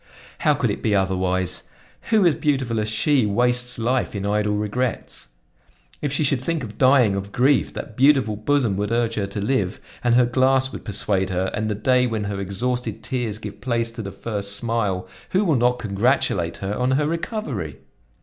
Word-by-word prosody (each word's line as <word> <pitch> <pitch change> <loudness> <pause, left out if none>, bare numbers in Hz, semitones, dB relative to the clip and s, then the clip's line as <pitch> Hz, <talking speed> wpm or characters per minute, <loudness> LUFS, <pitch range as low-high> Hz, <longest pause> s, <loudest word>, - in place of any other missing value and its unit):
How 150 - +3
could 125 -6 0
it - - -4
be 105 -3 +1
otherwise? 95 -1 0 0.4
Who 215 -4 +4
as 170 - +5
beautiful 130 -7 0
as 105 0 -1
she 115 +3 +2
wastes 125 +3 +1
life 120 0 0
in 100 0 -3
idle 105 0 +1
regrets? 105 - -3 0.7
If 145 - -1
she 145 +2 +1
should 135 -3 +1
think 160 +1 -2
of 110 -2 -9
dying 130 -6 +5
of 100 +1 -4
grief 135 +1 +2
that 110 - -7
beautiful 130 -5 +4
bosom 115 -2 +1
would 105 +2 -2
urge 115 -1 +1
her 100 -3 -1
to 100 +1 -5
live, 105 -3 0 0.2
and 120 -1 +3
her 125 0 +5
glass 130 +2 +2
would - - -8
persuade 100 -2 0
her; 95 +1 -1
and 110 +1 -1
the 105 - -1
day 125 +4 +2
when 110 -3 -2
her 100 -1 -3
exhausted 120 +6 -3
tears 120 -5 -2
give 105 -1 -9
place 115 -2 -1
to 115 0 -7
the 100 -2 -6
first 100 -2 -4
smile, 105 -5 -1 0.2
who 195 +3 +2
will 165 - +3
not 125 0 +2
congratulate 100 -6 0
her 100 - -1
on 125 +4 0
her 145 +2 +2
recovery? 150 - -3
115 Hz, 190 wpm, -22 LUFS, 100-130 Hz, 0.7 s, as